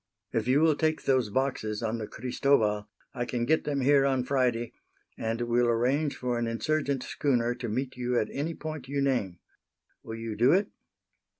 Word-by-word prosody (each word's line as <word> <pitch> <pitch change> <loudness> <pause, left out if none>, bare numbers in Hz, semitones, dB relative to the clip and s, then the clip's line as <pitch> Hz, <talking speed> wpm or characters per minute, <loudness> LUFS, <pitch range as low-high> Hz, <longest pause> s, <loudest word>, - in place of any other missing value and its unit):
If 115 0 0
you 135 +4 +4
will 160 -1 +5
take 155 +1 0
those 130 -5 +2
boxes 115 -3 -1
on 115 +1 -1
the 110 - -4
Cristobal 110 -4 +1 0.2
I 120 -2 -2
can 120 -1 -2
get 160 +5 +2
them 140 -2 -1
here 140 +1 +5
on 135 -2 +1
Friday 125 -3 0 0.4
and 115 +1 -2
will 120 0 +2
arrange 130 +6 +1
for 125 -1 -1
an 120 - -1
insurgent 140 +3 -1
schooner 120 -4 0
to 120 -1 -5
meet 130 +4 -2
you 125 0 0
at 110 - -1
any 155 +4 -3
point 155 -4 -6
you 140 +1 -2
name. 125 -10 0 0.6
Will 110 - -7
you 115 -1 -5
do 120 +7 +4
it?" 200 +3 +2
125 Hz, 185 wpm, -28 LUFS, 115-140 Hz, 0.6 s, will